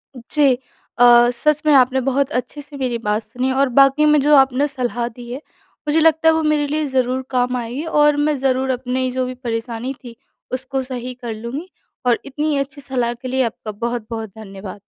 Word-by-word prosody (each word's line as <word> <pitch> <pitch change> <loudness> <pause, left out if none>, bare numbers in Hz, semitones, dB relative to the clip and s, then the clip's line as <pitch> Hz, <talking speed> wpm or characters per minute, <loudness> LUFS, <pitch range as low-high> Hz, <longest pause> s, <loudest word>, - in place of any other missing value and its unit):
जी। 270 +3 +2 0.4
अ, 245 - +5 0.3
सच 300 0 +2
में 300 - +5
आपने 260 0 +4
बहुत 270 +1 0
अच्छे 290 +3 -11
से 290 0 -12
मेरी 255 -3 -1
बात 215 -1 -1
सुनी 250 +4 -2
और 270 +1 +2
वाक़ई 275 +2 +5
में 300 0 +5
जो 295 +1 +5
आपने 270 +1 +4
सलाह 245 -3 -2
दी 240 +1 -10
है, 255 - -4 0.5
मुझे 310 +2 +3
लगता 320 0 +4
है, - - +5
वो 320 0 0
मेरे 305 -1 +1
लिए 305 +1 -1
ज़रूर 260 -1 0
काम 250 -1 0
आएगी 245 +4 -4
और 295 -2 +3
मैं 290 0 +1
ज़रूर 265 0 0
अपनी 255 0 -1
जो 255 0 -1
भी 255 - -5
परेशानी 235 +1 -4
थी, 240 -2 -10 0.4
उसको 260 +1 -2
सही 255 -1 -6
कर 240 -2 -6
लूँगी 235 +10 -6 0.4
और 245 -1 +3
इतनी 295 +2 -1
अच्छी 275 +1 -4
सलाह 250 -3 -1
के 240 +2 -9
लिए 260 +1 +1
आपका 220 -1 -5
बहुत-बहुत 225 0 -4
धन्यवाद। 195 -1 -9
260 Hz, 195 wpm, -19 LUFS, 240-285 Hz, 0.5 s, अ